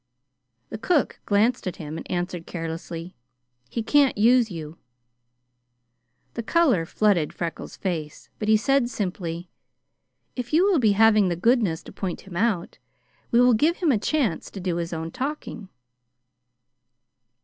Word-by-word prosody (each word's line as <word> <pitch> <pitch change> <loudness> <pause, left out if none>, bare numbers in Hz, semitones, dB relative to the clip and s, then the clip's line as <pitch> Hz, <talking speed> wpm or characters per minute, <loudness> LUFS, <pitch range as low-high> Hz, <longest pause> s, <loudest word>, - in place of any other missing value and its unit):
The 220 - -6
cook 300 +3 +1
glanced 215 +2 +2
at 180 - -3
him 155 0 -7
and - - -8
answered 175 -1 -3
carelessly: 165 +1 -6 0.5
"He 230 - -3
can't 280 +1 +3
use 235 +2 +4
you." 160 -3 -8 1.5
The 235 - -3
color 245 - +2
flooded 195 -8 +2
Freckles' 170 -2 -5
face, 160 -6 -4
but 210 - -3
he 215 0 +5
said 270 +2 +2
simply: 180 -5 -4 0.8
"If 250 +2 -5
you 340 +5 +5
will 390 -6 +3
be 220 -4 +4
having 215 -1 +5
the 175 - -1
goodness 205 -3 +1
to - - -11
point 185 -3 -4
him 190 -3 -12
out, 195 -2 -1 0.5
we 235 - +3
will 245 0 +6
give 310 +10 +2
him 335 -5 +2
a 225 - +2
chance 240 - -1
to 195 - -8
do 180 -2 -2
his 170 0 -3
own 165 0 -4
talking." 260 - -5
205 Hz, 150 wpm, -24 LUFS, 170-245 Hz, 1.5 s, will